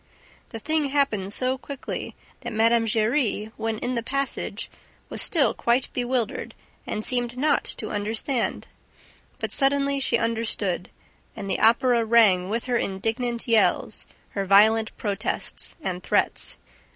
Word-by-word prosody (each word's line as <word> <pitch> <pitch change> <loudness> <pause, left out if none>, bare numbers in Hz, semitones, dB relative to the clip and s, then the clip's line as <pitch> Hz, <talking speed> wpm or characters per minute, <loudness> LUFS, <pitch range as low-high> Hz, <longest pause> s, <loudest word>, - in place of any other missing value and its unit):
The 225 - -7
thing 310 +6 0
happened 270 -9 0
so 255 +4 0
quickly 280 0 -6 0.2
that 240 -2 -6
Mme. 230 +1 +3
Giry, 220 -1 0
when 225 -1 -2
in 245 +3 -2
the 235 - 0
passage, 275 +3 -3 0.4
was - - -3
still 280 - +3
quite 240 +2 0
bewildered 245 -3 -2 0.3
and 215 - -3
seemed 245 -1 0
not 290 +2 +2
to 215 - -6
understand. 220 +5 -2 0.7
But, - - -4
suddenly, 280 0 +2
she 245 -3 +1
understood; 225 -6 -1 0.5
and 195 - -6
the - - -1
Opera 235 +1 +4
rang 215 -5 +4
with 230 +2 -1
her 250 -1 0
indignant 230 +5 -2
yells, 230 -2 +2 0.2
her 200 - -3
violent 215 +3 +4
protests 205 -2 0
and 180 -4 -3
threats. - - +2
230 Hz, 135 wpm, -24 LUFS, 215-255 Hz, 0.7 s, Opera